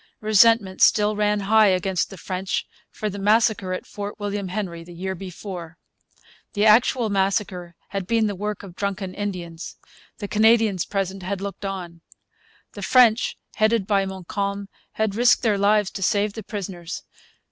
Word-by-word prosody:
Resentment 215 -2 +4
still 210 0 +4
ran 210 0 +1
high 215 +2 +5
against 185 -1 +1
the 195 - -10
French 185 +2 -3 0.2
for 215 - -4
the 200 -1 -5
massacre 210 -2 +2
at 185 - -4
Fort 205 +1 -7
William 205 -1 -3
Henry 180 -3 -4
the 175 +1 -12
year 190 +2 -3
before. 180 -2 -8 0.8
The 205 0 +1
actual 225 +1 +4
massacre 190 -3 -1
had 195 -2 -4
been 230 0 +2
the 205 - -1
work 210 +2 -4
of 185 -3 -11
drunken 195 -1 -3
Indians. 180 -5 -5 0.4
The 205 - -5
Canadians 220 -3 +3
present 195 -1 -3
had 190 +1 -3
looked 200 +1 -6
on. 175 -4 -6 0.7
The - - -8
French, 240 -3 +4 0.2
headed 220 -1 +2
by 200 -2 +1
Montcalm, 200 +2 -4 0.2
had 220 -2 -1
risked 240 +4 +4
their 210 -4 +2
lives 205 0 +3
to - - -7
save 205 +2 +1
the 220 - -6
prisoners. 190 -5 -6
200 Hz, 160 wpm, -23 LUFS, 185-210 Hz, 0.8 s, high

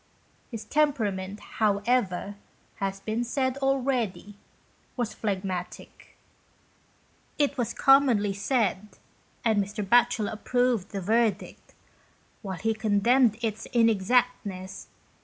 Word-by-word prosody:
His 230 -3 -7
temperament, 210 -10 0 0.2
however, 205 -2 +1 0.5
as 195 -1 -1
has - - -14
been 220 +3 -2
said 260 +2 -1
already, 255 -7 -1 0.6
was 240 -3 -2
phlegmatic. 190 -3 -5 1.2
It 285 -1 +1
was 245 -5 -2
commonly 255 -7 +4
said, 205 -1 -1 0.5
and 215 -3 +3
Mr. 205 0 -5
Batchel 240 -1 +3
approved 245 -2 0
the 200 -2 -5
verdict, 220 +1 -1 0.7
whilst 190 -3 -6
he 225 0 +2
condemned 220 +2 +3
its 220 -1 -3
inexactness, 225 -5 +2 0.3
29 185 -3 -6
GHOST 190 - -9
TALES. - - -10
220 Hz, 110 wpm, -27 LUFS, 200-245 Hz, 1.2 s, commonly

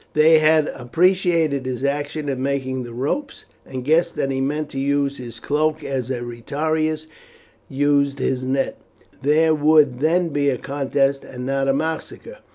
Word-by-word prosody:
They 155 +1 +6
had 155 0 +4
appreciated 165 0 +1
his 130 0 -4
action 145 +2 -2
in 135 -2 -2
making 130 -1 -2
the 120 -1 -8
ropes, 150 - -3 0.2
and 130 -1 -6
guessed 170 +3 +2
that 135 - -1
he 135 0 -1
meant 150 +2 -2
to 135 - -5
use 140 0 0
his 120 -2 -9
cloak 155 +1 0
as 130 -3 -3
a 125 -2 -2
retiarius 155 +6 -2 0.6
used 140 0 +1
his 130 -1 -1
net; 130 +1 -1 0.4
there 155 +3 +3
would 150 -4 +4
then 170 +4 +2
be 145 -1 +1
a 130 - 0
contest 140 0 -1
and 125 -1 -8
not 135 0 0
a 135 - +3
massacre. 160 - -4
140 Hz, 165 wpm, -21 LUFS, 135-155 Hz, 0.6 s, They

